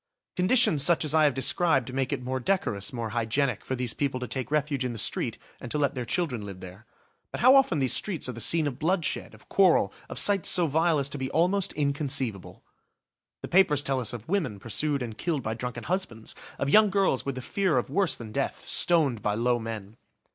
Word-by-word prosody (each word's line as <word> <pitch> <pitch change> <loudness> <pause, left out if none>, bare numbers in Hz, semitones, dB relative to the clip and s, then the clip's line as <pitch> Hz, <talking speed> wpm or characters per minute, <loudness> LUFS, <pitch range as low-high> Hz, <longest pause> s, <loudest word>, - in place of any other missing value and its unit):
Conditions 185 - +4
such 165 +2 +4
as 150 - -2
I 155 -1 +4
have 145 - +1
described 135 -3 +1
make 135 -1 -2
it - - -3
more 130 +1 -3
decorous, 120 - -1
more 115 -3 -4
hygienic, 120 +1 -1
for 130 - -3
these 125 -2 -2
people 135 -3 -2
to 125 - -5
take 130 +2 -3
refuge 145 -2 -1
in 125 -1 -3
the - - -7
street - - -1 0.2
and 120 - -8
to 150 - -2
let 145 -2 0
their 125 -3 -5
children 140 - -2
live 100 -2 -9
there. 95 +4 -12 0.4
But - - -5
how 255 +3 +7
often 270 - +3
these 130 -3 +2
streets 185 -10 -1
are - - -3
the 120 -1 -4
scene 165 +4 +5
of 140 -2 -4
bloodshed, 170 0 -1
of - - -21
quarrel, 180 - +3 0.2
of - - -7
sights 200 -3 +3
so 175 - +5
vile 160 +2 +1
as 140 -1 0
to 145 - -6
be 130 0 -3
almost 180 +4 +1
inconceivable. 140 - -2 0.8
The - - -4
papers 165 -6 +3
tell 135 -2 0
us 120 - -2
of 120 -1 -9
women 160 - -1
pursued 140 +6 -2
and 115 -3 -7
killed 155 +1 -3
by 110 - -2
drunken 120 +1 -6
husbands! 170 - -4 0.2
Of 140 - -2
young 215 +2 +6
girls 195 -9 +1
with 140 -2 -4
the 130 - -6
fear 185 +1 0
of 125 - -2
worse 190 -2 +1
than 110 -2 -10
death, - - -4
stoned 145 -10 +3
by 105 0 -1
low 120 +2 +1
men. 110 -2 -7
135 Hz, 220 wpm, -26 LUFS, 120-165 Hz, 0.8 s, how